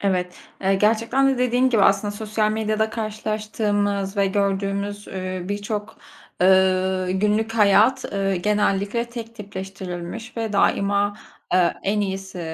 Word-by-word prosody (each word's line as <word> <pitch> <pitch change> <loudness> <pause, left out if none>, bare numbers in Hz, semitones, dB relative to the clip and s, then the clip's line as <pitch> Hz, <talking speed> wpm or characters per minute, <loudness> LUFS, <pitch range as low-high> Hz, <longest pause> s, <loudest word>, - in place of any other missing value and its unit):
Evet, 180 -2 -1 0.3
eee, 195 +1 +3
gerçekten 230 +6 +2
de, - - -7
dediğin 250 +1 +2
gibi, 220 -5 +3
aslında 195 +1 +3
sosyal 215 +1 -1
medyada 220 0 0
karşılaştığımız 210 -2 -2
ve 200 0 +3
gördüğümüz, 200 +1 -1
ııı, 185 -1 -5
birçok, 205 +1 -4 0.4
ııı, 185 0 +3
günlük 210 +4 +1
hayat, 215 +3 +4
ııı, 195 -1 0
genellikle 205 +3 0
tek 230 -1 -7
tipleştirilmiş 195 +2 -7
ve 225 -2 -2
daima, 200 +1 +2 0.4
eee, 180 -2 +3
en 210 +2 0
iyisi, 190 -2 -4
205 Hz, 125 wpm, -22 LUFS, 195-215 Hz, 0.4 s, hayat